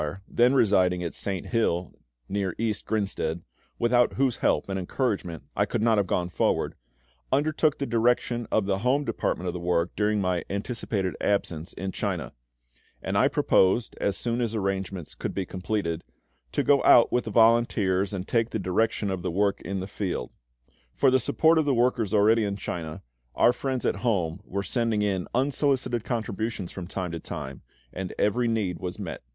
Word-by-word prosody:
then 125 +3 +3
residing 95 -6 +3
at 85 - -4
Saint 95 -3 -3
Hill, 90 - 0 0.3
near 95 -3 -2
East 110 -2 -2
Grinstead, 95 -6 -2 0.3
without 120 +1 +3
whose 130 -3 +1
help - - +1
and 95 -1 -2
encouragement 90 - -2
I - - +2
could - - -1
not 115 -2 +4
have 100 - 0
gone 90 -1 0
forward, - - 0 0.6
undertook 155 +1 +2
the 140 - -2
direction 120 0 +1
of 110 - +2
the 95 -1 0
home 130 +6 +1
department 90 - -2
of 90 - -1
the 90 - -4
work 85 0 0
during 105 0 +1
my 90 -2 0
anticipated 100 -2 -2
absence 85 -5 -1
in 95 +1 -4
China; - - -3 0.7
and - - -2
I - - +5
proposed, 95 +5 +2
as 100 -1 0
soon 120 0 -1
as 115 -2 -1
arrangements 95 -4 -3
could - - -5
be 95 - -1
completed, 90 -3 -3 0.5
to - - +1
go 140 -1 +4
out 120 - +7
with 125 - +1
the - - -3
volunteers 110 -4 +3
and 95 -2 -4
take 115 -1 +1
the - - -2
direction 100 +2 0
of 95 -2 -3
the 90 - -2
work 100 +3 +1
in 95 -1 -3
the - - -4
field. 95 -1 -4 0.6
For 135 - +4
the 130 - +4
support 160 +6 +3
of 155 - +1
the 140 -3 +2
workers 120 -4 +1
already 110 +2 +4
in 100 -1 -2
China, 80 -5 -5 0.3
our 120 - +5
friends 130 -2 -3
at - - +1
home 95 -7 -1
were 100 +1 -3
sending 115 +1 0
in 95 -3 -1
unsolicited 130 -3 +1
contributions 110 -5 -3
from 90 -3 -7
time 90 -2 -4
to 85 - -4
time, 65 -3 -7 0.3
and 95 0 -5
every 120 +4 +2
need 105 -7 -1
was 90 -1 -5
met. - - -6
100 Hz, 180 wpm, -26 LUFS, 95-120 Hz, 0.7 s, out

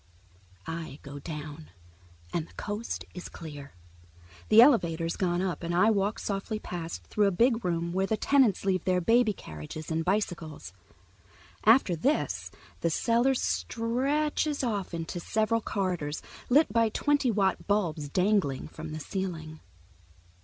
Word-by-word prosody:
I 165 -3 -5
go 145 0 -8
down, 150 0 -7 0.6
and 165 -1 -1
the - - -20
coast 210 +3 -4
is 180 - -7
clear. 145 -4 -9 0.8
The 215 - +7
elevator's 170 - +5
gone 180 -1 0
up, 185 -2 -2
and 170 0 -2
I 215 +5 +5
walk 205 +1 0
softly 200 +2 -3
past 170 - -6
and - - -26
through 210 -1 +3
a - - +2
big 230 +4 +2
room 170 -1 -1
where 190 +1 +1
the 220 - 0
tenants 260 -9 +3
leave 185 -3 +1
their 185 -1 +3
baby 225 +4 +4
carriages 115 - -8
and 160 0 0
bicycles. 170 - -2 0.9
After 220 -5 +5
this 275 - 0 0.3
the 170 - +1
cellar 235 - +2
stretches 280 +6 0
off 205 -6 -1
into 165 +1 -4
several 220 +5 0
corridors, 180 -9 -2 0.3
lit 275 -3 +4
by 230 -1 +4
twenty 285 +3 +1
watt 195 -3 +1
bulbs 170 -8 0
dangling 180 -6 +1
from 155 0 -8
the 155 - -4
ceiling. 160 -2 -5
190 Hz, 145 wpm, -29 LUFS, 165-225 Hz, 0.9 s, The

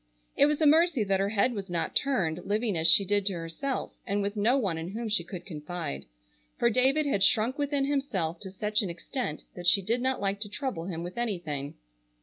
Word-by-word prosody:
It 285 - +5
was 300 0 0
a 315 - +3
mercy 315 -4 +4
that 195 -1 +1
her 195 +1 +1
head 220 +4 +1
was 200 -4 -6
not 170 -2 -2
turned, 180 - 0
living 210 0 0
as 160 0 +3
she 195 +4 +7
did 205 +1 +1
to 200 - +1
herself, 170 +11 -4
and 200 -1 0
with 200 +1 -3
no 225 +6 +3
one 190 -10 -1
in 165 - -5
whom 225 +3 -4
she 210 -4 +1
could 180 0 -8
confide. 150 - -5 0.5
For 235 - +3
David 265 +6 +3
had 205 -9 0
shrunk 240 +5 +3
within 285 -1 0
himself 205 - -1
to 190 - -7
such 210 +3 0
an 200 - -3
extent 170 - -4
that 175 -1 -4
she 195 +2 +5
did 230 +5 0
not 260 0 0
like 200 0 -1
to 205 -1 -3
trouble 225 - -4
him 170 -3 -5
with 180 +7 -6
anything. 165 -11 -3
205 Hz, 220 wpm, -28 LUFS, 175-250 Hz, 0.5 s, she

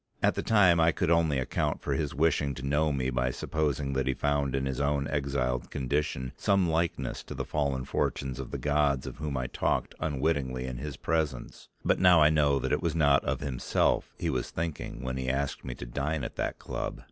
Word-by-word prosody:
At - - +4
the - - -2
time 95 -6 +5
I 80 0 +5
could 85 +1 0
only 80 -4 +3
account 65 0 -1
for 70 - -1
his 70 -1 -2
wishing 75 -2 +2
to 65 - -6
know 75 +2 +2
me 65 -2 -1
by 65 0 +1
supposing 70 0 -1
that 65 0 0
he 65 - +1
found 70 -2 0
in 65 0 0
his 65 0 -2
own 70 0 +1
exiled 70 -4 -1
condition 65 -1 -2
some 100 -3 +2
likeness 80 +1 -1
to - - -7
the - - -3
fallen 70 -3 -1
fortunes 65 -1 -2
of 65 - -5
the - - -4
gods 75 -3 +1
of - - -7
whom 75 -3 -3
I 65 - -1
talked - - -1
unwitting 70 -3 0
of 65 -1 -5
his 70 +1 -5
presence; 75 -7 -2 0.2
but - - +3
now 90 -2 +7
I 75 0 +6
know 75 -2 +3
that 65 0 -2
it 75 - +1
was 85 -3 -1
not 70 -3 +4
of - - -1
himself 70 -4 0
he - - -1
was - - -2
thinking 80 -6 -4
when 65 +1 -3
he 65 -1 -2
asked 70 +1 -1
me 60 -2 -5
to - - -7
dine 70 +4 -2
at - - -5
that - - -2
club. - - -4
70 Hz, 215 wpm, -29 LUFS, 65-75 Hz, 0.2 s, now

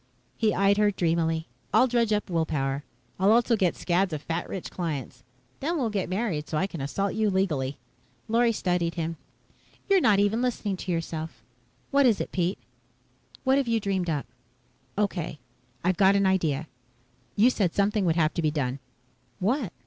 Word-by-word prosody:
He 220 -2 +2
eyed 200 +1 +3
her 210 0 +4
dreamily. 165 -3 0 0.3
"I'll - - +5
dredge 235 -3 +1
up 210 0 +1
will 165 -4 0
power. 135 -1 -1 0.4
I'll 195 +2 +4
also 235 +1 +4
get 185 -5 +1
scads 180 +1 +1
of 150 -1 -4
fat 165 +1 -3
rich 190 - -5
clients. 145 -7 -4 0.4
Then 330 +5 -1
we'll 240 -7 0
get 195 -4 -2
married 185 -6 -2
so 155 - -1
I 185 - +2
can 170 -6 -6
assault 195 +8 -1
you 220 -1 +1
legally." 155 -9 0 0.5
Lorry 230 +1 +3
studied 175 -5 -1
him. 165 -1 -3 0.7
"You're 390 -2 +4
not 215 -7 +4
even 205 +3 +2
listening 230 -5 -1
to 180 - -4
yourself. 165 -1 -4 0.5
What 280 -1 +5
is 225 -4 +3
it, - - -4
Pete? 180 +1 0 0.9
What 265 +1 +4
have 270 - -1
you 230 -1 +2
dreamed 195 -4 -1
up?" 150 -3 -1 0.7
"Okay. 185 -7 -1 0.5
I've 180 0 +1
got 195 +1 +5
an 200 0 +3
idea. 160 -5 +1 0.7
You 235 +5 +5
said 190 -8 0
something 205 +1 +2
would 165 -2 +2
have 155 -2 +2
to 170 - -1
be 155 - +2
done." 140 -3 -2 0.6
"What?" 220 - 0
190 Hz, 180 wpm, -27 LUFS, 165-215 Hz, 0.9 s, I'll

